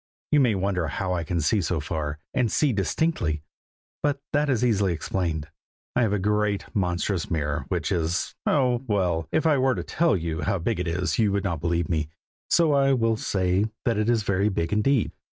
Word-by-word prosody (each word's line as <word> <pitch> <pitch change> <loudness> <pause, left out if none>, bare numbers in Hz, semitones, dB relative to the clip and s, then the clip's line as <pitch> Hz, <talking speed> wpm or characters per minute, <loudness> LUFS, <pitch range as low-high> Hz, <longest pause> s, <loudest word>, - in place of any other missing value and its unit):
You 150 - +5
may 125 -6 +3
wonder 95 -3 0
how 90 +5 -2
I 85 -2 -1
can 85 +2 -2
see 80 +7 +2
so 85 -1 -1
far, 75 0 -3 0.2
and 125 -5 +1
see 145 +2 +2
distinctly, 95 - 0 0.6
but 145 -1 0
that 145 0 +2
is 125 -2 +2
easily 100 -6 +2
explained. 80 -2 -2 0.5
I 125 - +3
have 110 -4 +2
a 105 - +2
great, 105 0 0
monstrous 90 -1 -1
mirror, 75 -2 -1
which 85 -5 -2
is 85 -1 -1
oh! 125 -4 +2
well, 90 -6 0
if 160 +1 +1
I 150 -4 +4
were 130 0 +2
to - - -3
tell 165 - +1
you 80 -2 -3
how 100 -1 0
big 95 +4 -1
it 90 - -2
is, 90 +5 -1
you 105 -3 +3
would 100 -1 0
not 85 -6 -2
believe 85 -1 0
me, 80 -3 -1 0.4
so 165 -3 +4
I 135 -1 +4
will 115 -3 +2
only 110 - -2
say 95 +1 +1 0.2
that 115 -3 +1
it 110 +2 +1
is 115 -2 +2
very 100 0 +1
big 85 -3 -1
indeed. 110 +3 +2
100 Hz, 205 wpm, -25 LUFS, 85-120 Hz, 0.6 s, You